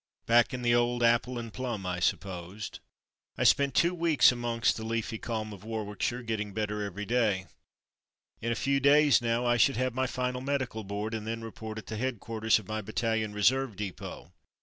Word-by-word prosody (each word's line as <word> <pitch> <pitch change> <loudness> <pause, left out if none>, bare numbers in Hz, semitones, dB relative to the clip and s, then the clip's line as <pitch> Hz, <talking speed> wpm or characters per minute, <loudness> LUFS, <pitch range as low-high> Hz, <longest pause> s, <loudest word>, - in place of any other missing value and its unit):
Back 120 0 +4
in 125 -1 -4
the 120 0 +3
old 120 0 +2
"apple 120 +2 +3
and 115 -2 -6
plum,'" 120 -7 -4
I 90 -1 -2
supposed. 90 +3 -3 0.6
I - - 0
spent 140 -1 +4
two 170 +1 +4
weeks 165 -6 +5
amongst 120 -1 0
the 110 - -6
leafy 115 0 -2
calm 110 -2 -4
of 100 -1 -12
Warwickshire 110 +2 -3
getting 105 -3 -3
better 105 -1 -2
every 100 0 -4
day. 110 -5 +1 1.0
In 115 - -1
a - - 0
few 140 +3 +1
days 145 -1 +5
now 120 +1 0
I 120 0 +3
should 135 +1 +4
have 130 0 0
my 130 +1 0
final 125 0 -2
Medical 130 -5 -2
Board 105 +3 -4
and 110 -1 -4
then 115 0 -3
report 110 -1 -7
at 110 - -7
the 110 - -5
head 130 -1 -2
quarters 110 0 +1
of 105 -4 -9
my 110 0 -3
Battalion 110 0 -1
Reserve 115 +3 +2
Depot. 100 -2 -7
115 Hz, 195 wpm, -29 LUFS, 105-125 Hz, 1.0 s, weeks